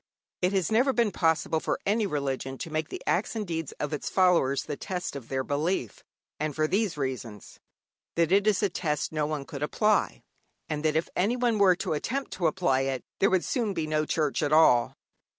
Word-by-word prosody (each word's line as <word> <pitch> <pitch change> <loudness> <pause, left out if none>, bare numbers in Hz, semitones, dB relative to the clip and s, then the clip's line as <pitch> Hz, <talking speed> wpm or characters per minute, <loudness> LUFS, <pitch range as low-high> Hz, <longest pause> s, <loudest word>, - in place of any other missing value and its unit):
It 180 +1 +2
has 190 0 0
never 255 +5 +3
been 235 -4 +2
possible 160 -2 +1
for - - -2
any 210 +1 +1
religion 135 -4 -3
to 165 - -6
make 155 0 -2
the - - -7
acts 195 +6 0
and 215 -2 -2
deeds 165 -4 -4
of 150 +1 -4
its 150 - -3
followers 175 -8 +3
the 145 - -4
test 180 -1 -4
of 130 -5 -8
their 130 -1 -1
belief. 145 - -2 0.4
And 155 -1 -2
for 155 - +2
these 195 -2 0
reasons: 125 -7 -5 0.6
that 170 0 +2
it 200 +2 +4
is 210 -1 +3
a 205 - +3
test 155 -4 -2
no 155 -1 -1
one 150 -2 -3
could 140 0 -8
apply, 210 +8 +1 0.4
and 150 -1 -3
that 155 -1 +1
if 160 - +1
anyone 235 +3 +1
were 190 -3 +6
to 175 - -2
attempt 265 - -3
to 175 - 0
apply 155 -6 +1
it, 135 -1 -2 0.2
there 195 - +4
would 185 -2 +1
soon 225 -7 -1
be 160 - -1
no 155 0 0
Church 155 -1 0
at 145 -1 0
all. 140 -7 +5
160 Hz, 205 wpm, -27 LUFS, 145-195 Hz, 0.6 s, were